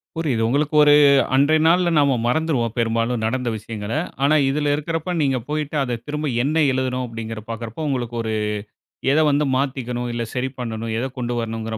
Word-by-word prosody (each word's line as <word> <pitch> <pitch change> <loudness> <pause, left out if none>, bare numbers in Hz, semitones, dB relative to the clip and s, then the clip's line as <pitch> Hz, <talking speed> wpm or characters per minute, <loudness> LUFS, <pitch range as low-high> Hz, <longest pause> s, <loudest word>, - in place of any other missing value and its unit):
புரியுது 145 -8 -1
உங்களுக்கு 145 +5 0
ஒரு 145 0 +6 0.4
அன்றைய 150 +3 +4
நாள்ல 175 +1 +4
நாம 140 -3 +3
மறந்துருவோம், 125 -5 0
பெரும்பாலும் 115 0 0
நடந்த 125 +2 -1
விஷயங்கள. 105 0 -7 0.3
ஆனா 150 +2 +4
இதில 145 +1 +1
இருக்கிறப்ப, 165 +3 -3
நீங்க 135 -2 +1
போய்ட்டு 150 0 -2
அத 120 -3 -3
திரும்ப 150 -1 -2
என்ன 155 +3 +2
எழுதனோம் 130 -1 -1
அப்படிங்கிறத 115 -1 -6
பார்க்கிறப்போ, 115 +6 -5
உங்களுக்கு 120 -3 -2
ஒரு 110 -1 -2 0.8
எத 155 - +4
வந்து 145 +1 +2
மாத்திக்கணும்? 125 -3 -2
இல்ல 120 0 -2
சரி 130 +1 -1
பண்ணணும்? 115 -2 -4
எத 125 - -1
கொண்டு 120 0 -2
வரணும்ங்கிற 115 -1 -4
130 Hz, 165 wpm, -21 LUFS, 115-150 Hz, 0.8 s, ஒரு